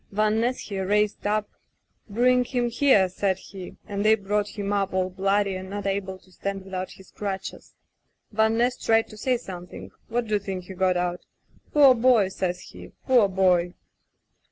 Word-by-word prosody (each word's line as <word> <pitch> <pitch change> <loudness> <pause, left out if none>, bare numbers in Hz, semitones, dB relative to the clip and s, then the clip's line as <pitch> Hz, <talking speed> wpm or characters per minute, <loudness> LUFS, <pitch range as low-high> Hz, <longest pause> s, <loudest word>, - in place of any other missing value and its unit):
Van 215 +2 +1
Ness 245 +2 -1
he 200 -2 -5
raised 205 +2 0
up 210 0 0 0.3
— - - -42
"'Bring 250 +4 +3
him 245 -1 -1
here,' 235 -6 +4
said 190 +1 -1
he, 190 -1 -10
and 200 0 -3
they 215 +1 +6
brought 205 0 -1
him 205 0 -2
up 195 -2 -1
all 185 0 0
bloody 195 +1 +1
and 185 0 -7
not 205 0 -5
able 195 -1 -2
to 185 0 -24
stand 195 +1 -5
without 185 -1 -5
his 190 - -17
crutches. 195 -2 -6 0.6
Van 220 +1 +2
Ness 245 +1 +1
tried 225 0 +3
to 215 - -11
say 250 +4 0
something 180 -6 -9
— - - -33
^what 240 0 -1
do 215 - -3
you 210 - +3
think 190 -2 -5
he 190 - -9
got 185 -1 +1
out? 175 0 -2 0.3
— - - -33
*Poor 280 -3 +7
boy!' 235 -5 +4
says 180 -2 -3
he, - - -12
*poor 245 -6 +5
boy! 180 -2 +2
200 Hz, 195 wpm, -25 LUFS, 190-220 Hz, 0.6 s, Poor